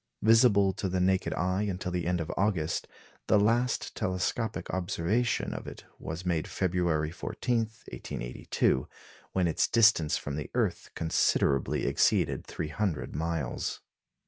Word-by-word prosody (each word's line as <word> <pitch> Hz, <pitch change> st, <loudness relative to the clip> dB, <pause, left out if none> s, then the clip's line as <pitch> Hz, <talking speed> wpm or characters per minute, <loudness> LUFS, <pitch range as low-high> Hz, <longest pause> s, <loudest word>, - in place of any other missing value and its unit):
Visible 110 Hz, -3 st, +5 dB
to 95 Hz, -, -3 dB
the 90 Hz, 0 st, 0 dB
naked 95 Hz, +1 st, +2 dB
eye 90 Hz, +2 st, 0 dB
until 95 Hz, -3 st, -2 dB
the 90 Hz, -1 st, -2 dB
end 90 Hz, 0 st, +1 dB
of 80 Hz, -, -3 dB
August, 95 Hz, -6 st, 0 dB, 0.4 s
the 105 Hz, -, +5 dB
last 115 Hz, +4 st, +1 dB
telescopic 110 Hz, +3 st, -2 dB
observation 95 Hz, +6 st, 0 dB
of -, -, -7 dB
it -, -, -9 dB
was 80 Hz, +3 st, -6 dB
made 85 Hz, -3 st, 0 dB
February 85 Hz, -4 st, 0 dB
14, 120 Hz, +7 st, -2 dB
1882, 65 Hz, -, -2 dB, 0.5 s
when 90 Hz, -2 st, +2 dB
its 80 Hz, -, +2 dB
distance 110 Hz, -9 st, +4 dB
from 70 Hz, -, -5 dB
the 75 Hz, -, -5 dB
earth -, -, 0 dB
considerably 70 Hz, -4 st, +1 dB
exceeded -, -, +2 dB
300 80 Hz, -, -2 dB
million -, -, -2 dB
miles. 80 Hz, -6 st, -2 dB
90 Hz, 135 wpm, -29 LUFS, 80-105 Hz, 0.5 s, Visible